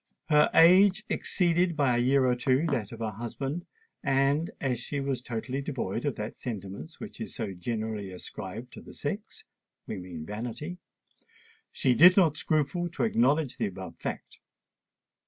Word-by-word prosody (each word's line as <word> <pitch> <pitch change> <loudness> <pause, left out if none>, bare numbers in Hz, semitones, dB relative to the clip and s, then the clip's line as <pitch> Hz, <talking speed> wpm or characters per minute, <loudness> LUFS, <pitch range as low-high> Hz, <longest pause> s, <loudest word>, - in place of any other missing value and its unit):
Her 150 -1 +5
age 190 +5 +7
exceeded 175 -2 +1
by 135 -5 +3
a - - +2
year 130 +2 +3
or 125 - +3
two 130 +4 +2
that 115 -7 -1
of 115 -1 -9
her 110 -1 -1
husband, 135 - -5 0.4
and, 140 +3 +2
as 125 -3 -1
she 140 +3 -4
was 135 -2 -2
totally 125 +3 -3
devoid 120 -5 -3
of 145 - 0
that 105 +1 -5
sentiment 100 - -6
which - - -9
is - - -6
so 100 - -3
generally 110 +1 -3
ascribed 110 +5 -8
to - - -9
the - - -12
sex—we 105 - -7
mean 90 -4 -7
vanity—she 125 - -5
did 180 +8 +8
not 165 -6 +5
scruple 155 +4 0
to 170 - -3
acknowledge 145 - +2
the - - 0
above 95 -1 -8
fact. - - -6
130 Hz, 155 wpm, -28 LUFS, 110-155 Hz, 0.4 s, did